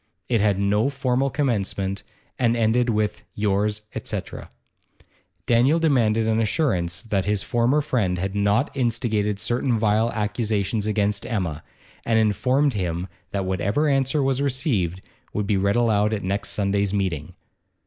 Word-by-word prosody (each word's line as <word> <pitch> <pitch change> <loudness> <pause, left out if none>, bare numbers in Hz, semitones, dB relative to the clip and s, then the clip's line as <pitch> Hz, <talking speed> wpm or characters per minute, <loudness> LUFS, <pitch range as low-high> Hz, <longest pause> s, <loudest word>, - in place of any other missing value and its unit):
It 115 -4 +2
had 100 -2 +2
no 105 +5 +2
formal 135 -1 0
commencement, 100 -8 -1 0.4
and 120 -2 +2
ended 115 +2 +2
with 105 -1 -1
'Yours, 105 +1 0
etc.' - - -5 1.0
Daniel 125 +7 +4
demanded 115 -9 +2
an 110 0 +2
assurance 100 - 0
that 100 -5 -1
his 105 -1 0
former 120 +5 +2
friend 110 -11 0
had 95 +2 -3
not 105 +7 +1
instigated 110 -5 0
certain 120 +2 0
vile 110 +1 +2
accusations 105 -1 -1
against 105 -1 0
Emma, 85 -9 -3 0.4
and 115 -1 +1
informed 125 +6 +2
him 90 -2 -2 0.2
that 100 -1 -2
whatever 100 - 0
answer 135 +1 +1
was 135 0 +1
received 125 - 0 0.3
would 105 - -1
be 100 - +1
read 100 +1 +1
aloud 110 -3 +2
at 105 - -5
next 100 +2 -2
Sunday's 100 0 0
meeting. 90 -7 -2
105 Hz, 140 wpm, -23 LUFS, 100-125 Hz, 1.0 s, Daniel